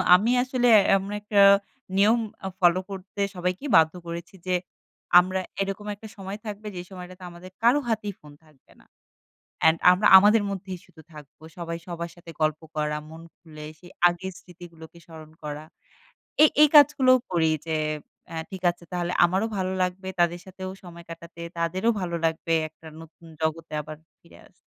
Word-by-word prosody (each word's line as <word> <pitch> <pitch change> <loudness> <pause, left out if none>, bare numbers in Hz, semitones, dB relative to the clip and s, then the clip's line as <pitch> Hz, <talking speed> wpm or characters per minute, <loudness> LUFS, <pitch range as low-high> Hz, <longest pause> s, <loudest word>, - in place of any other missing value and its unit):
আমি 215 +6 +2
আসলে 255 -1 0 0.3
আমরা 195 +2 -5
একটা 205 -1 +2 0.6
নিয়ম 215 +4 +4 0.3
আ - - -1
ফলো 175 0 +4
করতে 195 +1 -7
সবাইকে 180 +7 -3
বাধ্য 160 -1 +4
করেছি 170 +2 -7
যে, 185 - +1 0.6
আমরা 185 +1 -1 0.2
এরকম 195 +1 -4
একটা 220 +2 -12
সময় 195 +1 -6
থাকবে, 210 0 -7
যে 175 - -5
সময়টাতে 185 0 -10
আমাদের 175 +2 -12
কারো 245 +5 +5
হাতেই 210 -2 -2
ফোন 150 - -15
থাকবে 150 -4 -26
না। - - -24 0.8
অ্যান্ড 160 +1 +4
আমরা 185 +4 +3
আমাদের 210 +3 +5
মধ্যেই 190 -2 -6
শুধু 160 - -18
থাকবো। 150 0 -14
সবাই 170 -1 -5
সবার 170 -1 -5
সাথে 170 -1 -12
গল্প 155 0 +1
করা, 150 0 -1
মন 160 +1 -11 0.2
খুলে 155 -3 -12
সেই 180 +1 -15 0.2
আগের 175 +2 -6
স্মৃতিগুলোকে 170 -2 -14
স্মরণ 160 -2 -13
করা। 150 0 -6 0.8
এই, 305 - +7
এই 305 - +8
কাজগুলোও 270 -3 +6
করি 165 -3 +2 0.2
যে, 160 -1 -1 0.5
অ্যা 165 - -5
ঠিক 190 -1 -8
আছে, 175 0 -12
তাহলে 175 0 -2
আমারও 190 +5 +1
ভালো 185 -1 -2
লাগবে, 185 +1 -3
তাদের 175 0 +1
সাথেও 185 0 -7
সময় 170 -1 -12
কাটাতে। 170 0 -11 0.2
তাদেরও 185 +7 0
ভালো 170 -2 -3
লাগবে, 165 0 0
একটা 160 +1 -20
নতুন 165 +1 -16 0.2
জগতে 160 0 -2
আবার 155 +1 -9 0.2
ফিরে 170 - -19
আস - - -23
180 Hz, 165 wpm, -25 LUFS, 165-195 Hz, 0.8 s, এই